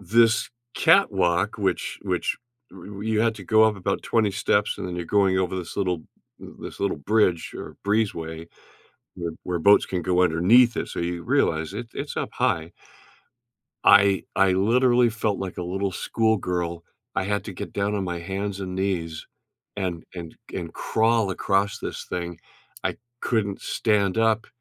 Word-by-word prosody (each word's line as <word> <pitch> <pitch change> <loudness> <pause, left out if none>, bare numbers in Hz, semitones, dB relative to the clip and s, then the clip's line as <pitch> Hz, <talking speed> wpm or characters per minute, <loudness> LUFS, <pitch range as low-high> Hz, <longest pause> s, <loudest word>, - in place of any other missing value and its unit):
this 115 +4 +3 0.3
catwalk, 100 - +3
which 100 -3 -1
which - - -1 0.3
y 95 -2 -12
y 100 0 -7
you 110 -1 +1
had 115 0 +2
to 100 - -9
go 110 +3 +5
up 110 -1 +2
about 100 0 -2
20 110 -3 +2
steps 100 +1 +1
and - - -4
then 90 -1 -5
you're 85 - -3
going 95 -2 +3
over 95 0 -1
this 90 -2 -6
little 90 -5 -1 0.4
this - - -10
little 100 -3 0
bridge 90 0 +1
or - - -8
breezeway 85 -6 -1 0.7
where 85 -1 -4
where 90 -1 -2
boats 100 +5 +6
can 90 -2 -3
go 90 +1 +2
underneath 95 +9 +5
it, - - -2
so - - -5
you 85 0 -3
realize 95 - +1
it 115 +3 -5
it's - - -5
up - - -2
high. 80 +1 0 1.1
I 100 -1 +6
I 95 -1 +4
literally 120 +5 +3
felt 110 -2 -1
like 95 -2 -5
a 90 - -2
little 95 +2 -2
schoolgirl, 90 -6 -1 0.3
I 85 - 0
had 105 +1 -1
to 105 - -6
get 90 - -7
down 100 +1 0
on 100 - -1
my 90 -1 -3
hands 95 +3 -4
and 90 -1 -5
knees 90 -5 -2 0.5
and 90 -4 -3
and 85 -3 -7 0.2
and 85 -1 -5
crawl 110 -2 +1
across 100 +2 0
this - - -5
thing. 85 -1 -4 0.4
I - - -1 0.2
couldn't 100 -5 -1
stand 105 -3 +1
up 110 -1 +2
95 Hz, 170 wpm, -24 LUFS, 90-110 Hz, 1.1 s, boats